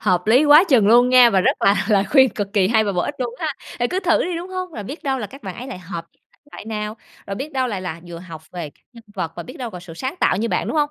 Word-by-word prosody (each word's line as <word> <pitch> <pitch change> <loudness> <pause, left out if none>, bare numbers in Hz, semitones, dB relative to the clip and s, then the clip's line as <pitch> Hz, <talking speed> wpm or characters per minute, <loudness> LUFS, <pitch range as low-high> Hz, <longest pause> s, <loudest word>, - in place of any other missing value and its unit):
hợp 180 -2 +1
lý 250 +7 +5
quá 300 +4 +8
chừng 240 -9 +4
luôn 240 +3 +6
nha, 250 -2 +7
và 190 - +3
rất - - +1
là 200 0 +3
lời 200 -3 +3
khuyên 265 -2 +6
cực 200 -2 -5
kỳ 195 -3 +3
hay 220 -1 +3
và 200 - -1
bổ 180 - 0
ích 290 - -3
luôn 240 -2 -3
ha? 320 - -2 0.3
Ừ, 240 - +1
cứ 370 - -1
thử 340 -4 +2
đi, 355 -1 -3
đúng 345 +2 -6
hông? 370 -1 -5
Rồi 215 - -6
biết 280 - -8
đâu 270 -3 -1
là 215 - -4
các 275 +6 -14
bạn 190 -3 -6
ấy 250 - -7
lại 255 -9 -7
hợp 170 -2 -7
với - - -39
thể - - -31
loại - - -9
nào, 215 0 -4 0.3
rồi 200 - -4
biết 290 +7 -6
đâu 260 -1 0
lại 205 -5 -3
là 170 -3 -6
vừa 170 -1 -8
học 165 -3 -10
về 170 -4 -6
các - - -34
nhân 235 -1 -14
vật 170 -5 -3
và - - -5
biết 255 - -11
đâu 245 -3 -5
là 180 - -8
sự 175 -2 -11
sáng 260 - -4
tạo - - +3
như 225 +4 -1
bạn, - - -1
đúng - - -2
hông? 295 -1 +2
225 Hz, 330 wpm, -21 LUFS, 190-270 Hz, 0.3 s, quá